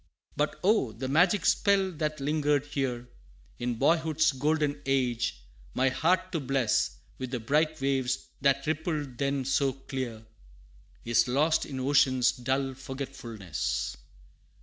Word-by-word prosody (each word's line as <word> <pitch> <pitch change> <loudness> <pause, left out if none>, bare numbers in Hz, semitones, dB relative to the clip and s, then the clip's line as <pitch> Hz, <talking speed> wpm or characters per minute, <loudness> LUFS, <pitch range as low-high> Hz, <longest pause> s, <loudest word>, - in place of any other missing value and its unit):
But 150 +1 -1
oh! 185 - +3
the 130 +4 -5
magic 175 +8 +3
spell 195 -2 +3
that 155 -2 -3
lingered 145 0 +1
here, 130 -4 -3 0.5
In 120 0 -1
boyhood's 160 +3 +2
golden 145 +1 0
age, 120 - 0 0.3
my 130 +1 +3
heart 180 +7 +1
to 165 - -1
bless, 130 - 0 0.2
With 130 -1 -4
the 125 -1 -3
bright 155 +6 +1
waves 135 -1 0
that 140 0 +2
rippled 155 -4 -2
then 140 -1 0
so 135 0 +1
clear, 130 -4 -6 0.8
Is 115 0 +3
lost 150 +6 +2
in 135 - -5
ocean's 130 -2 +3
dull 135 +2 -1
forgetfulness. 110 - -4
135 Hz, 125 wpm, -28 LUFS, 125-150 Hz, 0.8 s, oh